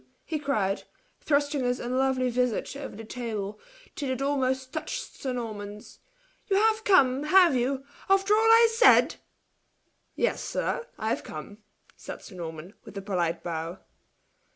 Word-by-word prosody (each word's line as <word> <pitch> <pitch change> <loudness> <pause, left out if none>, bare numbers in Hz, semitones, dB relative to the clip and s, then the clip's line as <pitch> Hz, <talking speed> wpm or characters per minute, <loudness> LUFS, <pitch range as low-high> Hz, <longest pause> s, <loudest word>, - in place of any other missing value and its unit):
he 315 -2 -2
cried, 215 -9 0 0.4
thrusting 285 -2 +1
his 245 0 0
unlovely 255 0 0
visage 250 +1 -1
over 280 -6 -7
the 225 - -8
table, 215 -4 -5 0.4
till 280 -3 -3
it 260 -1 -2
almost 265 -1 0
touched 315 - -4
sir 265 - -4
Norman's. 210 -4 -6 0.5
"You 395 - +1
have 440 +2 +3
come, 280 -9 +4
have 355 -2 +6
you, 260 +2 0 0.3
after 390 +1 +4
all 425 - +5
I 455 +1 +7
said?" 460 +2 +5 1.0
"Yes, - - 0
sir 470 - -2
I 220 - -2
have - - -1
come!" 180 +7 -9 0.4
said - - -9
Sir - - -12
Norman, 165 +1 -7
with - - -11
a - - -3
polite 175 -4 -1
bow. 165 +1 -4
255 Hz, 150 wpm, -27 LUFS, 210-295 Hz, 1.0 s, I